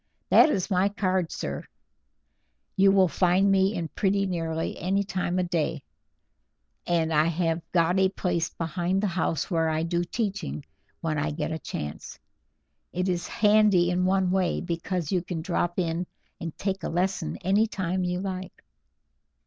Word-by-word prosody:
That - - +7
is 195 -6 -1
my 190 +2 +3
card, 185 -4 0
sir; - - -4 1.1
you 195 0 +5
will 190 -1 +5
find 185 +3 +3
me 195 +2 +3
in 170 -3 -2
pretty 200 -1 +1
nearly 165 -3 -2
any 195 +3 +1
time 185 -2 -2
of 180 - +1
the - - -9
day, 160 -3 -1 1.0
and 165 -2 +1
I 155 0 +4
have 165 0 0
got 175 +2 +3
a 190 0 +4
place 175 -3 -1
behind 175 +3 -2
the - - +3
house 175 -3 -1
where 165 -2 +2
I 155 0 0
do 170 +1 0
teaching 175 - -3 0.4
when 155 -3 -1
I 155 +2 0
get 150 +1 -3
a 160 - -3
chance. 75 - -6 0.7
It 180 +1 -1
is 175 -1 -1
handy 205 -4 +4
in 180 +1 +1
one 190 -1 +2
way, 185 -2 +1
because 175 -1 -3
you 185 -2 +2
can 170 -2 -5
drop 175 0 -1
in 170 -1 -1 0.3
and 165 -2 -6
take 195 -1 -2
a - - -3
lesson 175 - -1
any 205 +4 +3
time 185 -2 -2
you 180 0 -1
like." 190 -1 -6
180 Hz, 165 wpm, -26 LUFS, 165-190 Hz, 1.1 s, That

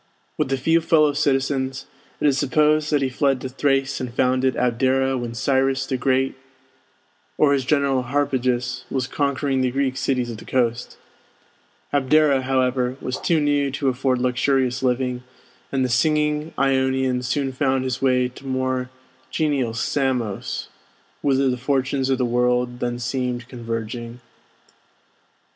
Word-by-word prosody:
With 145 -3 -1
a 135 - +1
few 165 +6 +2
fellow 155 -2 +3
citizens, 135 -2 0 0.3
it - - -1
is 140 -2 +4
supposed 150 +2 +2
that 145 -2 +2
he 130 - 0
fled 135 0 +1
to 130 - -4
Thrace 135 0 0
and 125 -2 -4
founded 130 +1 +1
Abdera 130 +2 +1
when 120 -2 -4
Cyrus 135 +1 +1
the 135 - -2
Great, 130 +1 +1 1.0
or 145 -2 +4
his 135 -3 0
general 140 -2 +2
Harpagus, 130 -2 -1
was 130 -2 -1
conquering 140 -1 -1
the 130 - +2
Greek 130 0 -1
cities 125 -3 -1
of 115 - -7
the - - -12
coast. 120 -2 -1 1.0
Abdera, 145 0 +3
however, 130 -1 0
was 130 - -4
too 165 -2 +2
new 145 -1 +1
to 135 0 -1
afford 130 0 0
luxurious 125 +1 +1
living, 125 -1 0 0.5
and 130 -1 +1
the - - +1
singing 150 +4 +1
Ionian 130 -1 +1
soon 135 +2 -1
found 130 0 +1
his 130 -1 -3
way 125 -2 +3
to 130 +2 -12
more 130 -1 -1 0.4
genial 140 -7 0
Samos, 125 -5 -2 0.5
whither 135 -1 +2
the 125 -1 0
fortunes 135 +1 0
of 135 - +2
the 125 - +1
world 125 0 +1
then 120 -1 -2
seemed 125 0 -3
converging. 115 -1 -5
130 Hz, 145 wpm, -22 LUFS, 125-140 Hz, 1.0 s, is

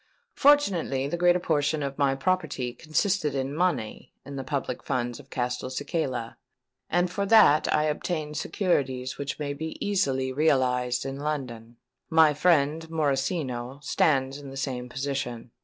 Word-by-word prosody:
Fortunately, 190 - +3
the 150 - -2
greater 175 +1 +4
portion 150 -3 0
of 140 +1 -4
my 140 -1 +3
property 140 -6 -1
consisted 155 - 0
in 135 +1 -2
money 155 -9 -1
in 140 - -8
the 135 - -4
public 135 +1 -3
funds 120 -1 -2
of - - -15
Castelcicala; 130 +1 -3 0.5
and 175 +1 +1
for 200 +2 -1
that 200 -9 +6
I 150 - +3
obtained 155 0 -2
securities 135 -7 -1
which 140 -1 -3
may 145 -1 -3
be 160 +3 -6
easily 135 -10 0
realised 125 -4 +1
in 135 0 -4
London. 125 -6 -4 0.3
My 160 -2 +5
friend 160 0 +2
Morosino 140 -4 -1
stands 135 -2 +1
in 140 -1 -9
the 135 - -8
same 125 -2 -3
position. 125 -3 -4
140 Hz, 140 wpm, -27 LUFS, 130-160 Hz, 0.5 s, that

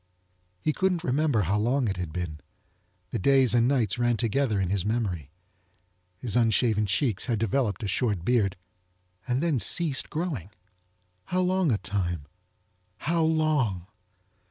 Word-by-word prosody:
He 155 - 0
couldn't 185 -1 0
remember 135 -3 +1
how 100 +3 0
long 125 +3 +1
it 100 -2 -2
had 90 -3 -4
been. 80 -2 -5 0.7
The 115 - -2
days 135 +3 +4
and 120 0 +4
nights 125 -5 +1
ran 120 -1 +2
together 115 -1 0
in 95 -1 -1
his 100 -3 0
memory. 100 - -2 0.9
His 110 +1 -2
unshaven 110 -2 +2
checks 105 -1 0
had 120 -3 0
developed 115 +1 -1
a - - -2
short 100 -2 -1
beard 110 -6 +2 0.7
and 130 +4 0
then 160 -7 +1
ceased 155 +1 +3
growing. 150 - -3 0.8
How 185 0 0
long 185 -3 +1
a 110 - +2
time? 90 -7 -3 0.7
How 165 +1 0
long? 155 - +1
115 Hz, 145 wpm, -27 LUFS, 100-140 Hz, 0.9 s, days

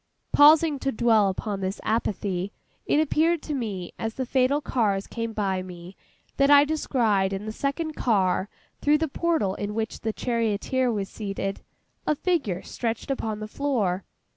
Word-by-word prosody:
Pausing 300 0 +6
to 270 - -1
dwell 220 -4 +3
upon 195 +1 -3
this 190 +2 -3
apathy, 200 -4 -1 0.4
it 295 - +3
appeared 315 +2 +2
to 300 - -4
me, 205 -9 -4
as 225 0 -3
the 260 - -2
fatal 260 +3 +2
cars 210 -9 0
came 230 -1 -4
by 195 -4 -1
me, 180 0 -10 0.4
that 275 0 +4
I 285 0 +8
descried 230 -10 +1
in 195 +2 -4
the 215 - -3
second 285 +7 -2
car, 195 -6 +1 0.3
through 295 +1 +4
the 320 +1 0
portal 315 - 0
in 205 +1 -4
which 225 0 -3
the 220 - -2
charioteer 235 +2 0
was 200 -3 -2
seated, 195 -2 -4 0.5
a 305 - +3
figure 280 - -1
stretched 235 +3 -3
upon 220 -5 -3
the 215 - -4
floor. 215 -8 -1
225 Hz, 165 wpm, -25 LUFS, 195-280 Hz, 0.5 s, I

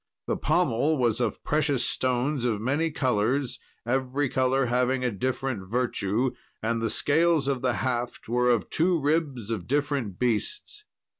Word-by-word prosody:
The - - -1
pommel 145 +7 +1
was 120 -2 +1
of - - -2
precious 145 -3 +1
stones 130 +2 0
of 115 -4 0
many 145 +8 0
colours, 130 -1 0 0.3
every 130 +3 0
colour 130 +1 +2
having 125 +2 +1
a 125 - +1
different 120 -2 -3
virtue, 120 0 0 0.3
and 115 +1 -1
the 115 - 0
scales 160 +3 +2
of 135 -3 0
the 125 -2 +1
haft 120 -1 -2
were 125 +2 +2
of 115 -5 +1
two 170 +1 +2
ribs 145 -7 -1
of 100 -6 -3
different 140 -8 -1
beasts. 410 - -2
130 Hz, 150 wpm, -26 LUFS, 120-145 Hz, 0.3 s, colour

